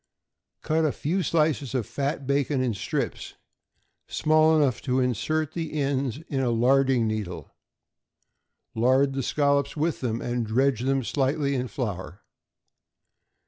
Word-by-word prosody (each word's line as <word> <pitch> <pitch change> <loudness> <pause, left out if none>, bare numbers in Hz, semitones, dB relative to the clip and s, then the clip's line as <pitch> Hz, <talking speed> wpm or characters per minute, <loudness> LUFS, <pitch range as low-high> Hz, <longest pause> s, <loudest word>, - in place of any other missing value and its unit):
Cut 160 +1 +1
a 155 - +2
few 175 +9 -1
slices 155 -6 0
of 120 -5 0
fat 140 - -3
bacon 140 0 +1
in 125 -3 0
strips 100 - -4 0.7
small 155 0 +3
enough 140 -6 +1
to 130 -1 0
insert 150 +5 -1
the 165 -2 -4
ends 135 -4 -1
in 135 - -2
a 130 -2 +1
larding 130 +1 +3
needle; 90 -8 -4 1.2
lard 130 +4 +3
the 135 - -2
scallops 140 +1 +1
with 155 +1 0
them, 115 -3 -1
and 120 0 -2
dredge 130 +2 +2
them 135 +1 +1
slightly 140 +2 0
with 125 -1 -2
flour. 100 -5 -5
135 Hz, 135 wpm, -26 LUFS, 125-145 Hz, 1.2 s, small